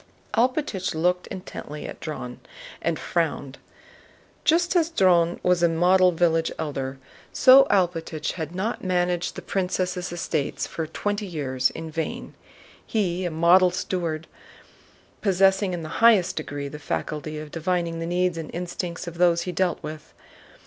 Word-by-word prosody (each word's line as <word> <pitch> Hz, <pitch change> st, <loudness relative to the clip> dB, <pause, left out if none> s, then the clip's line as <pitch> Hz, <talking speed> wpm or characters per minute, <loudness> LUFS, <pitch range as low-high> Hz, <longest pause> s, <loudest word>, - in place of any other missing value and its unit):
Alpátych 240 Hz, -, 0 dB
looked 180 Hz, +3 st, +1 dB
intently 150 Hz, -5 st, -7 dB
at -, -, -8 dB
Dron 125 Hz, -6 st, -6 dB, 0.4 s
and -, -, 0 dB
frowned. -, -, -2 dB, 0.8 s
Just 345 Hz, +3 st, +3 dB
as 335 Hz, -2 st, +3 dB
Dron 175 Hz, -, +3 dB
was 180 Hz, -1 st, +3 dB
a 170 Hz, -, +5 dB
model 180 Hz, +2 st, +4 dB
village 165 Hz, -1 st, +1 dB
Elder, 135 Hz, -4 st, -4 dB, 0.3 s
so 265 Hz, +1 st, +7 dB
Alpátych 170 Hz, -5 st, 0 dB
had 160 Hz, -1 st, -6 dB
not 210 Hz, +5 st, -2 dB
managed 180 Hz, -1 st, 0 dB
the -, -, -7 dB
prince's 185 Hz, -1 st, -1 dB, 0.2 s
estates 165 Hz, -4 st, -2 dB
for 160 Hz, -1 st, -4 dB
twenty 205 Hz, +4 st, -3 dB
years 130 Hz, -7 st, 0 dB
in 160 Hz, 0 st, -7 dB
vain. 160 Hz, 0 st, -4 dB, 0.5 s
He 185 Hz, -5 st, -1 dB
was 185 Hz, -, -1 dB
a -, -, -1 dB
model 170 Hz, +3 st, +5 dB
steward, 170 Hz, -3 st, -3 dB, 1.0 s
possessing 195 Hz, 0 st, +3 dB
in 175 Hz, -2 st, -4 dB
the 155 Hz, -, -6 dB
highest 225 Hz, -6 st, +5 dB
degree 145 Hz, -2 st, -4 dB
the 150 Hz, +1 st, -8 dB
faculty 155 Hz, +1 st, -4 dB
of 150 Hz, 0 st, -8 dB
divining 170 Hz, 0 st, -1 dB
the 165 Hz, -, -3 dB
needs 175 Hz, -1 st, 0 dB
and 160 Hz, -, -6 dB
instincts 175 Hz, -1 st, -4 dB
of 170 Hz, 0 st, -8 dB
those 170 Hz, -1 st, +4 dB
he 180 Hz, -, -3 dB
dealt 180 Hz, 0 st, 0 dB
with. 155 Hz, 0 st, -8 dB
175 Hz, 150 wpm, -25 LUFS, 160-185 Hz, 1.0 s, so